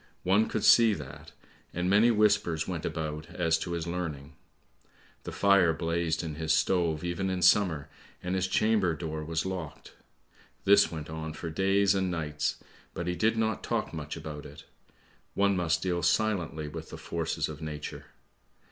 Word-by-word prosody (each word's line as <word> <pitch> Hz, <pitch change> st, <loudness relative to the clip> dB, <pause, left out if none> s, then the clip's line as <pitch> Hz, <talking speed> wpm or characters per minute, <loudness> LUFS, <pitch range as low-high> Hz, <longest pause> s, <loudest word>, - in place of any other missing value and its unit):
One 100 Hz, +4 st, +3 dB
could 110 Hz, -, -2 dB
see 115 Hz, -3 st, +6 dB
that, 75 Hz, +1 st, -10 dB, 0.4 s
and 90 Hz, +1 st, -1 dB
many 105 Hz, +5 st, +5 dB
whispers 105 Hz, -8 st, +2 dB
went 85 Hz, -4 st, -4 dB
about 75 Hz, -1 st, -4 dB
as 80 Hz, -2 st, +1 dB
to 85 Hz, -, -4 dB
his 85 Hz, -2 st, -3 dB
learning. 80 Hz, -4 st, -5 dB, 0.9 s
The -, -, -5 dB
fire 100 Hz, -4 st, +4 dB
blazed 85 Hz, 0 st, -1 dB
in 80 Hz, -2 st, -4 dB
his 80 Hz, +1 st, -2 dB
stove 80 Hz, -1 st, +1 dB
even 90 Hz, +2 st, -2 dB
in 90 Hz, -1 st, -2 dB
summer, 90 Hz, -6 st, +4 dB, 0.4 s
and 90 Hz, +1 st, -2 dB
his 95 Hz, 0 st, 0 dB
chamber 100 Hz, -3 st, +2 dB
door 80 Hz, -2 st, -5 dB
was 80 Hz, +2 st, -2 dB
locked. 90 Hz, -5 st, -6 dB, 0.7 s
This 100 Hz, +1 st, +5 dB
went 80 Hz, -2 st, -6 dB
on 80 Hz, 0 st, -5 dB
for 80 Hz, +1 st, -6 dB
days 95 Hz, +3 st, +3 dB
and 95 Hz, -1 st, 0 dB
nights, 75 Hz, -4 st, -2 dB, 0.4 s
but 85 Hz, -, -3 dB
he 90 Hz, -, -1 dB
did 110 Hz, +4 st, +1 dB
not 110 Hz, -2 st, 0 dB
talk -, -, -2 dB
much 75 Hz, -1 st, -5 dB
about 75 Hz, -2 st, -7 dB
it. -, -, -12 dB, 0.7 s
One 100 Hz, 0 st, +3 dB
must 85 Hz, -2 st, 0 dB
deal 90 Hz, -2 st, 0 dB
silently 85 Hz, -9 st, 0 dB
with 80 Hz, +1 st, -8 dB
the -, -, -8 dB
forces -, -, -2 dB
of 75 Hz, 0 st, -8 dB
nature. 75 Hz, -1 st, -6 dB
85 Hz, 165 wpm, -29 LUFS, 80-95 Hz, 0.9 s, see